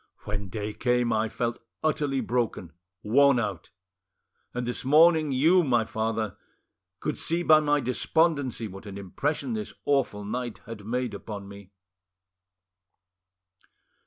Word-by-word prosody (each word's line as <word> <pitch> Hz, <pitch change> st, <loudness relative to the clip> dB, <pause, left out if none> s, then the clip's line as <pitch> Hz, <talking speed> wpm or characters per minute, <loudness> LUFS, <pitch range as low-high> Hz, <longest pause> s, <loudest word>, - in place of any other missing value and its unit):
When 105 Hz, -1 st, -4 dB
day 105 Hz, +2 st, -4 dB
came, 120 Hz, +1 st, +1 dB
I 110 Hz, 0 st, +1 dB
felt 120 Hz, +1 st, -2 dB, 0.2 s
utterly 145 Hz, -3 st, +1 dB
broken, 115 Hz, -8 st, -2 dB, 0.3 s
worn 135 Hz, +4 st, +5 dB
out; 100 Hz, -7 st, -4 dB, 0.8 s
and 125 Hz, 0 st, -3 dB
this 120 Hz, -, -3 dB
morning, 155 Hz, +2 st, +5 dB
you, 165 Hz, +8 st, +4 dB
my 120 Hz, -6 st, +2 dB
father, 110 Hz, -1 st, -2 dB, 0.6 s
could -, -, -3 dB
see 170 Hz, +2 st, -1 dB
by 155 Hz, -2 st, +7 dB
my 145 Hz, -1 st, +2 dB
despondency 135 Hz, -1 st, +1 dB
what 95 Hz, +1 st, -10 dB
an 100 Hz, -1 st, -7 dB
impression 145 Hz, -, -2 dB
this 215 Hz, -1 st, -5 dB
awful 130 Hz, -8 st, +1 dB
night 120 Hz, +2 st, -4 dB
had 105 Hz, -3 st, -9 dB
made 125 Hz, +1 st, -1 dB
upon 100 Hz, -2 st, -7 dB
me." 100 Hz, -1 st, -12 dB
120 Hz, 130 wpm, -27 LUFS, 105-145 Hz, 0.8 s, by